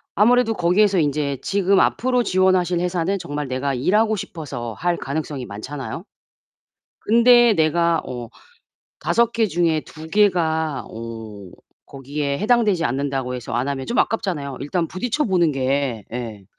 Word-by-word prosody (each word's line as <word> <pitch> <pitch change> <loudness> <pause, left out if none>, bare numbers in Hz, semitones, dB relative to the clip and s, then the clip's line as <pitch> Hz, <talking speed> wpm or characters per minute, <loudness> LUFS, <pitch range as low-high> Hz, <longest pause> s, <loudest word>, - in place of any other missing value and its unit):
아무래도 225 +2 +4
거기에서 190 +2 +3
인제 145 -2 0
지금 195 -1 +2
앞으로 250 0 +2
지원하실 185 -2 +2
회사는 180 +2 -1
정말 145 -4 -4
내가 130 +2 -2
일하고 215 - +2
싶어서 140 - -6
할 175 +5 -1
가능성이 140 -2 -4
많잖아요? 130 - -7 1.0
근데 235 0 +5
내가 165 0 +2
어 120 -2 -6 0.7
5 235 0 +1
개 230 -1 +2
중에 170 -4 +1
2 160 +1 -12
개가 160 -7 +1
어 110 -4 -8 0.4
거기에 140 +1 -4
해당되지 210 -6 +2
않는다고 135 -1 -2
해서 125 - -7
안 130 +3 -1
하면 135 -2 -3
좀 240 - -2
아깝잖아요. 160 -12 -1
일단 165 +4 -1
부딪혀 245 - -1
보는 175 -5 +2
게 130 -5 -1
예. 115 -5 -6
160 Hz, 300 characters per minute, -21 LUFS, 135-195 Hz, 1.0 s, 근데